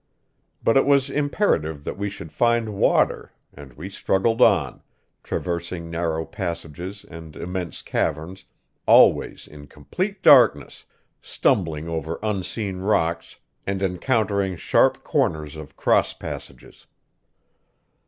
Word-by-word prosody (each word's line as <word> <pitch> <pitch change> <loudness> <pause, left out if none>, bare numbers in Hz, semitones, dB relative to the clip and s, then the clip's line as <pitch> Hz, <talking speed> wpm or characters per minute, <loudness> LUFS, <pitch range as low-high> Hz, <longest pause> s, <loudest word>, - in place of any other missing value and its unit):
But 115 - +3
it 135 - +4
was 140 -1 +3
imperative 110 - 0
that - - -5
we 100 +1 -3
should 85 -5 -10
find 120 -2 +1
water, 100 - +1 0.2
and 70 -3 -13
we 80 +9 -8
struggled 100 +3 0
on, - - +3 0.4
traversing 85 -1 -4
narrow 80 -1 -2
passages 90 0 -6
and 80 -2 -11
immense 90 -1 -5
caverns, 90 +5 -3 0.4
always - - +4
in 75 -1 -13
complete 190 - -5
darkness, 115 - +5 0.4
stumbling 80 -3 0
over 80 0 -3
unseen 100 -1 -3
rocks 85 -4 -1 0.3
and 100 0 -2
encountering 100 0 0
sharp - - +2
corners 75 -1 -1
of 75 -2 -11
cross - - +2
passages. - - -9
90 Hz, 115 wpm, -23 LUFS, 80-105 Hz, 0.4 s, darkness